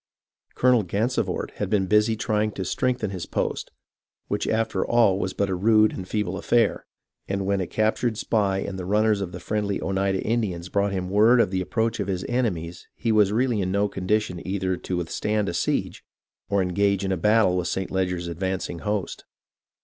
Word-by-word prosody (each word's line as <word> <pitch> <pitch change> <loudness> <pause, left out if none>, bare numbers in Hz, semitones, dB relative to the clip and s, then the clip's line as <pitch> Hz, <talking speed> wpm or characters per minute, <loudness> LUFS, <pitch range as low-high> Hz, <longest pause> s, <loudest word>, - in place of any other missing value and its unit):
Colonel 125 -2 +4
Gansevoort 105 +7 -1
had - - -2
been 100 -3 +2
busy 105 +3 +3
trying 110 -2 0
to 95 - -4
strengthen 125 0 -1
his 90 -3 -5
post, - - -2 0.6
which - - -1
after 110 -4 0
all 115 -5 +3
was 95 -1 -2
but 100 - 0
a 95 - -2
rude 110 +3 +4
and 95 - -6
feeble 95 -3 -2
affair, 115 +1 +1 0.4
and 100 0 -2
when 100 0 +1
a 90 - -3
captured 110 +1 0
spy 100 -4 +1
and 95 -1 -4
the 90 - -5
runners 105 +1 +2
of 90 -3 -4
the 90 - -7
friendly 100 +2 -2
Oneida 95 0 0
Indians 100 -7 -1
brought 100 0 +1
him 95 -2 -2
word 110 +5 +5
of 105 - +3
the 95 -1 0
approach 110 +4 -1
of 100 - -2
his 95 -2 -2
enemies 90 -9 -2
he 115 - -1
was 105 -2 +4
really 120 -1 +1
in 95 -1 -1
no 100 +1 +2
condi 100 +2 +1
tion 90 -5 -7
either 95 -1 -1
to 90 0 -4
withstand 105 +5 -1
a 85 - -2
siege 85 - -1 0.5
or 100 -2 +2
engage 100 +2 +1
in 95 0 0
battle 105 -1 +4
with 90 -1 -1
St. 95 -1 -3
Leger's 90 -2 -1
advancing 90 0 -3
host. 105 -1 -3
100 Hz, 190 wpm, -24 LUFS, 95-110 Hz, 0.6 s, word